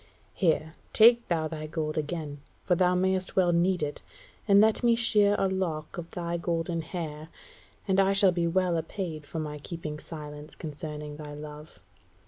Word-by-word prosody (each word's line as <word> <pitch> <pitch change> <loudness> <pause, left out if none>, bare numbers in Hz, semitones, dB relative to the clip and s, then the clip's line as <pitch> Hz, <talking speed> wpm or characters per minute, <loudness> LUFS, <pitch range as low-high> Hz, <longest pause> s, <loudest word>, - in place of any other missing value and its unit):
Here, 160 -3 +1 0.2
take 235 +2 +6
thou 160 -2 0
thy 155 -1 -6
gold 155 -1 -3
again, 150 -2 -4 0.2
for 180 - +2
thou 180 +1 +3
mayst 185 0 0
well 180 -2 +4
need 175 0 +2
it, 145 0 -4 0.5
and 200 -1 +7
let 220 +1 +4
me 235 -1 +4
shear 210 -3 +4
a 195 - +2
lock 175 -5 -2
of 170 0 -7
thy 170 -1 -3
golden 170 0 -1
hair, 155 -3 -6 0.6
and 190 0 +3
I 195 0 +4
shall 195 -1 +5
be 170 -1 0
well 180 0 +1
apaid 160 -3 -6
for 165 - -6
my 150 -1 -4
keeping 155 -1 -6
silence 150 -1 -9
concerning 150 -1 -6
thy 150 -1 -8
love. 150 -5 -10
165 Hz, 170 wpm, -28 LUFS, 155-185 Hz, 0.6 s, and